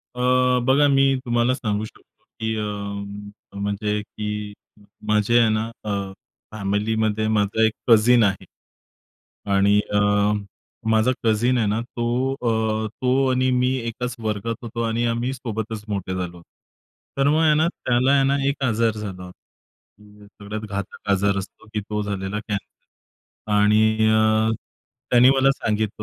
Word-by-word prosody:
अ, 125 0 +2
बघा 140 +3 +4
मी 135 -1 +4 0.2
तुम्हाला 120 +1 +2
सांगू 110 -5 -2
शकतो, - - -18 0.2
की 110 0 -1
अ, 105 - -2 1.0
म्हणजे 105 +1 -1
की 105 -1 -5 0.5
माझे 105 +2 +3
आहे 115 -2 +4
ना 110 +1 0 0.2
अ, - - -3 0.6
फॅमिलीमध्ये 110 +1 -1
माझा 110 0 +1
एक 110 - +1 0.2
कझिन 115 +1 +6
आहे. 100 -2 0 1.1
आणि 100 +1 +4 0.2
अ, - - +4 0.9
माझा 110 +2 +3
कझिन 120 +3 +2
आहे 110 - +1
ना 105 +2 0
तो 120 0 -5 0.3
अ, 110 -3 -1
तो 130 +4 +1
आणि 130 0 +2
मी 125 +1 +1
एकाच 125 +2 -4
वर्गात 110 +1 -2
होतो 115 0 -4
आणि 115 +1 -1
आम्ही 120 +2 -1
सोबतच 110 -4 -5
मोठे 95 -3 -3
झालो. 90 -2 -5 0.7
तर 140 0 +2
मग 155 +2 +3
आहे 155 -2 +4
ना 160 +2 +3
त्याला 125 -4 +1
आहे 140 -1 +4
ना 140 +1 +2
एक 140 0 -3
आजार 115 -2 +1
झाला 95 -4 -6
होता. 90 - -10 0.9
अ, - - -15
सगळ्यात 105 +1 -8
घातक 100 0 -6
आजार 100 0 +2
असतो 95 +3 -9
की 105 - 0
तो 105 +1 -3
झालेला 100 0 -3
कॅन्सर 105 +1 -10
आणि 110 +1 +3
अ, 110 0 +3 0.6
त्याने 125 +1 +6
मला 135 0 +4
सांगितलं 110 -5 -2
110 Hz, 145 wpm, -22 LUFS, 105-125 Hz, 1.1 s, कझिन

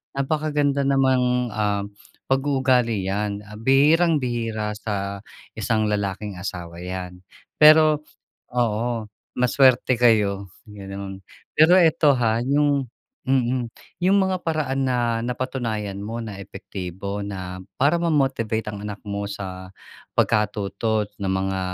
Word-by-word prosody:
Napakaganda 145 -1 0
namang, 125 -3 +2
um, 105 -1 0 0.5
pag-uugali 130 -6 +2
'yan, 100 0 -2
ah, 105 +1 -11
bihirang-bihira 130 -6 +2
sa 100 -2 -3 0.4
isang 110 0 +1
lalaking 100 -1 -3
asawa 85 -2 -6
'yan. 90 0 -6 0.4
Pero, 155 0 +7 0.5
oo, 120 -1 -1 0.3
masuwerte 130 0 +4
kayo 100 -5 +3 0.2
gano'n, 100 -2 -8 0.3
pero 160 +4 +6
ito, 160 -5 +4
ha, 115 -1 +1
yung 140 0 +1 0.4
mm, 125 -2 +1 0.3
yung 190 +3 +4
mga 190 -2 +1
paraan 155 -5 -1
na 120 -2 0
napatunayan 120 -5 -3
mo 115 +3 -5
na 100 -3 -7
epektibo 100 +1 -6
na 95 -2 -6 0.2
para 145 +6 +3
mamotivate 135 -9 0
ang 100 - -7
anak 105 -1 -6
mo 100 0 -4
sa 95 -2 -7 0.5
pagkatuto 105 +1 +1 0.2
ng 95 - -1
mga 95 0 -1
115 Hz, 110 wpm, -23 LUFS, 100-135 Hz, 0.5 s, Pero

